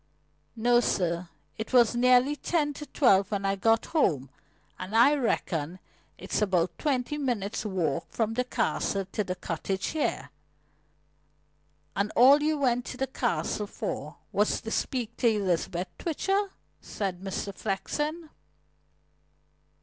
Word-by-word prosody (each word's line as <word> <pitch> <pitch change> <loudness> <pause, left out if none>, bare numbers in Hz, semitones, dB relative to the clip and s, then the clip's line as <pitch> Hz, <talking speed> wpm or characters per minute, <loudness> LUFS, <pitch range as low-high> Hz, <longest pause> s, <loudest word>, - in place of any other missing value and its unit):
"No, 240 +2 +4
sir. 170 -6 0 0.3
It 220 - -5
was 240 -2 +5
nearly 250 +3 +4
ten 295 -1 0
to 295 +1 -8
twelve 200 - +3
when 200 -2 -2
I 195 0 +1
got 225 +3 +2
home, 145 - +1 0.5
and 185 +4 -5
I 240 +6 +6
reckon 180 - -1 0.4
it's - - -2
about 180 -4 +1
twenty 290 0 -1
minutes' 225 -7 -2
walk 170 -8 -1
from 225 -1 -1
the 250 +2 0
Castle 200 -5 -1
to 210 - -1
the 185 -1 -3
cottage 185 +2 -3
here." 145 - -2 1.6
"And 200 +2 0
all 275 +4 +7
you 305 0 +1
went 245 -3 +1
to 255 - -7
the 265 - 0
Castle 240 -5 -2
for - - -5 0.2
was - - +1
to - - -6
speak 240 -4 -2
to 245 - +2
Elizabeth 185 -3 -1
Twitcher?" 390 +5 0 0.3
said 190 -3 -4
Mr. 195 +1 -4
Flexen. 300 - -3
225 Hz, 135 wpm, -28 LUFS, 190-265 Hz, 1.6 s, all